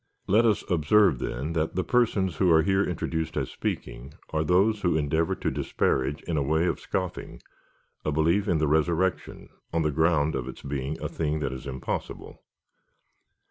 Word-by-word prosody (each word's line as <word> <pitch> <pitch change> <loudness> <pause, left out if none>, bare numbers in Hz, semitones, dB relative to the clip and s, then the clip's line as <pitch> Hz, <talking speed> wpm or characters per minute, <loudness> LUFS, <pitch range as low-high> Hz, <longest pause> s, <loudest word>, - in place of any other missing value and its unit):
Let 110 +5 +4
us 105 - +1
observe, 90 - +3
then, 70 +7 -3
that 80 0 -1
the 95 - 0
persons 105 -7 +1
who 95 - +3
are 80 -1 +5
here 95 0 +2
introduced 80 -2 -3
as - - -2
speaking, 65 +4 -5 0.2
are 80 0 0
those 100 +6 +2
who 90 -4 +2
endeavour 80 +2 0
to - - -2
disparage, 65 +2 -1
in 80 - -2
a - - +2
way 80 +4 +1
of 85 - -1
scoffing, 95 -2 -4 0.6
a 75 - -1
belief 85 +7 +2
in 85 - +2
the 75 0 +1
resurrection, 85 +5 0 0.2
on 85 0 +1
the 75 - +1
ground 80 0 +2
of 65 -2 -3
its 65 - -9
being 70 +2 -4
a - - 0
thing 75 -1 -2
that 65 -2 -2
is 65 +2 -8
impossible. 65 -1 -5
80 Hz, 180 wpm, -26 LUFS, 75-90 Hz, 0.6 s, are